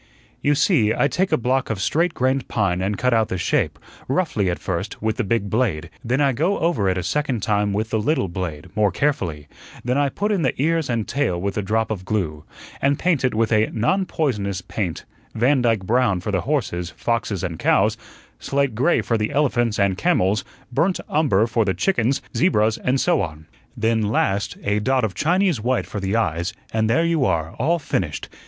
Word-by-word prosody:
"You 145 0 +2
see, 140 - +3
I 140 - +3
take 180 +8 0
a - - +4
block 130 +2 0
of 110 -3 -2
straight 165 - +1
grained 130 +1 0
pine 95 -4 0
and 100 +2 -1
cut 125 0 +1
out 110 -2 +3
the 95 - -3
shape, - - 0 0.3
roughly 130 - 0
at 85 - -1
first, 95 +3 -4
with 110 0 -1
the 125 - 0
big 100 0 0
blade; 100 -8 -1
then 125 +4 0
I 140 -2 +3
go 165 +11 0
over 160 - +1
it 95 - 0
a 90 - -2
second 130 - -1
time 105 -1 +1
with 110 +2 -2
the 110 - +1
little 115 -2 +1
blade, 85 -4 -5
more 105 -2 +3
carefully; 90 - -1 0.4
then 125 +3 +1
I 145 -1 +2
put 205 +10 -2
in 200 -4 +1
the 130 -5 0
ears 160 0 +1
and 115 -3 -1
tail 135 -10 0
with 100 +2 -2
a 105 - 0
drop 110 +3 0
of 100 -4 -3
glue, 85 -7 -2 0.4
and 140 +1 +2
paint 170 -6 +1
it 125 -3 +1
with 115 +1 +1
a 110 0 +3
'non 185 - +1
poisonous' 100 - -1
paint 90 -3 -4 0.3
Vandyke 120 -4 +2
brown 110 -4 +2
for 95 +4 -4
the 95 -3 0
horses, 105 - -1
foxes, 105 0 -2
and 85 -3 -4
cows; - - +3 0.4
slate 140 -3 0
gray 130 +10 +2
for 115 -2 0
the 105 - 0
elephants 120 -6 +1
and 100 -1 +1
camels; 105 - +2 0.3
burnt 175 +9 +1
umber 130 -10 +3
for 115 0 +1
the 95 -2 -1
chickens, 135 -8 +1
zebras, 110 -11 +2
and 130 +2 +1
so 175 +2 +2
on; 75 0 -5 0.3
then, 115 0 +1
last, 105 -1 0
a 105 +1 +1
dot 130 +3 +1
of 110 -4 -1
Chinese 175 - +1
white 125 +2 0
for 105 - -5
the 95 +2 -1
eyes, 90 -3 0 0.2
and 110 0 +1
there 145 +9 +3
you 165 -4 +1
are, 80 -7 0
all 160 +8 +2
finished. 90 - -3
115 Hz, 205 wpm, -22 LUFS, 100-140 Hz, 0.4 s, a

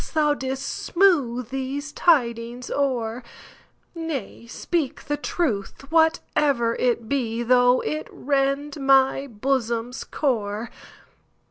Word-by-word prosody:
Thou 300 -1 +3
'dst 265 -2 -3
smooth 270 - +1
these 270 +3 -4
tidings 240 -7 +1
o'er,—Nay, 255 - -5
speak 300 +3 -2
the 295 - -1
truth, 275 - -2
whatever 295 -6 +2
it 235 -2 0
be, 240 -4 -1
Though 245 +1 +4
it 155 +1 -3
rend 280 +1 -1
my 270 0 +4
bosom's 240 0 -2
core. 225 -5 -2
260 Hz, 95 wpm, -24 LUFS, 235-285 Hz, -, Though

